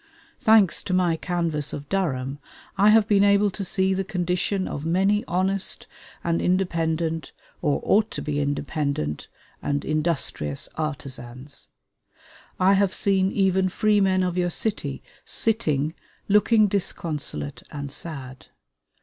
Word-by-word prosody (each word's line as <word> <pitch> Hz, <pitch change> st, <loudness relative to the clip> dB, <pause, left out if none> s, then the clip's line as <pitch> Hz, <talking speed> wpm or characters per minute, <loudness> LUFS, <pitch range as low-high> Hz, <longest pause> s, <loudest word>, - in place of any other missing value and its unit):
Thanks 215 Hz, -6 st, +5 dB
to 185 Hz, -, 0 dB
my 175 Hz, -3 st, +2 dB
canvass 165 Hz, -4 st, -2 dB
of 145 Hz, -1 st, -6 dB
Durham, 140 Hz, -8 st, -1 dB, 0.4 s
I 200 Hz, +2 st, +5 dB
have 215 Hz, 0 st, +5 dB
been 200 Hz, -2 st, +4 dB
able 200 Hz, 0 st, +4 dB
to 195 Hz, -, -5 dB
see 190 Hz, +1 st, +1 dB
the 190 Hz, +1 st, -1 dB
condition 185 Hz, +1 st, -1 dB
of 145 Hz, -, -5 dB
many 195 Hz, +5 st, +2 dB
honest 190 Hz, +2 st, 0 dB, 0.4 s
and 170 Hz, 0 st, 0 dB
independent 165 Hz, -3 st, 0 dB, 0.3 s
or 150 Hz, -4 st, +1 dB
ought 215 Hz, +2 st, +3 dB
to -, -, -4 dB
be 150 Hz, -1 st, -2 dB
independent 140 Hz, -, -2 dB, 0.3 s
and 145 Hz, 0 st, -2 dB
industrious 150 Hz, -, -1 dB
artisans. 135 Hz, -3 st, -6 dB, 0.9 s
I 190 Hz, +2 st, +5 dB
have 195 Hz, -1 st, +2 dB
seen 190 Hz, -1 st, +2 dB
even 190 Hz, -1 st, +2 dB
freemen 195 Hz, -2 st, +2 dB
of 180 Hz, 0 st, -1 dB
your 175 Hz, 0 st, +1 dB
city 170 Hz, -, -2 dB, 0.2 s
sitting, 155 Hz, -10 st, 0 dB, 0.3 s
looking 210 Hz, +1 st, +4 dB
disconsolate 150 Hz, -, -2 dB
and 140 Hz, -1 st, -6 dB
sad. 135 Hz, -5 st, -7 dB
175 Hz, 125 wpm, -24 LUFS, 145-195 Hz, 0.9 s, Thanks